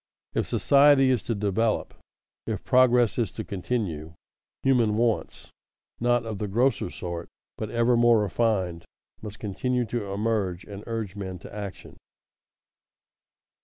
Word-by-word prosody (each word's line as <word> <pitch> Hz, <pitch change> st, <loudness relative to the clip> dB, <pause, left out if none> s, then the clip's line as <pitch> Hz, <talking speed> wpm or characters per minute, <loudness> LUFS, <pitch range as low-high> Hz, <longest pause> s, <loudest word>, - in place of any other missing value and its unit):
If -, -, 0 dB
society 140 Hz, -1 st, +5 dB
is 125 Hz, -5 st, +1 dB
to 115 Hz, -, +1 dB
develop, 105 Hz, +2 st, 0 dB, 0.5 s
if -, -, -3 dB
progress 125 Hz, -2 st, +4 dB
is 110 Hz, -7 st, 0 dB
to 110 Hz, -, -5 dB
continue, 90 Hz, -7 st, -3 dB, 0.5 s
human 120 Hz, -5 st, +3 dB
wants 115 Hz, -1 st, -1 dB, 0.5 s
not 120 Hz, 0 st, +2 dB
of 110 Hz, -3 st, -5 dB
the 105 Hz, -, -2 dB
grosser 120 Hz, 0 st, +1 dB
sort, 85 Hz, -1 st, -6 dB, 0.3 s
but 110 Hz, -, -5 dB
ever 115 Hz, +2 st, +2 dB
more 120 Hz, -1 st, +5 dB
refined 95 Hz, -6 st, 0 dB, 0.4 s
must 105 Hz, -2 st, -8 dB
continue 125 Hz, +5 st, -1 dB
to 110 Hz, -4 st, -4 dB
emerge 100 Hz, -4 st, -1 dB
and 100 Hz, 0 st, -9 dB
urge 110 Hz, -4 st, -4 dB
men 95 Hz, -2 st, -5 dB
to 90 Hz, -, -12 dB
action. 100 Hz, -3 st, -8 dB
110 Hz, 130 wpm, -26 LUFS, 100-120 Hz, 0.5 s, society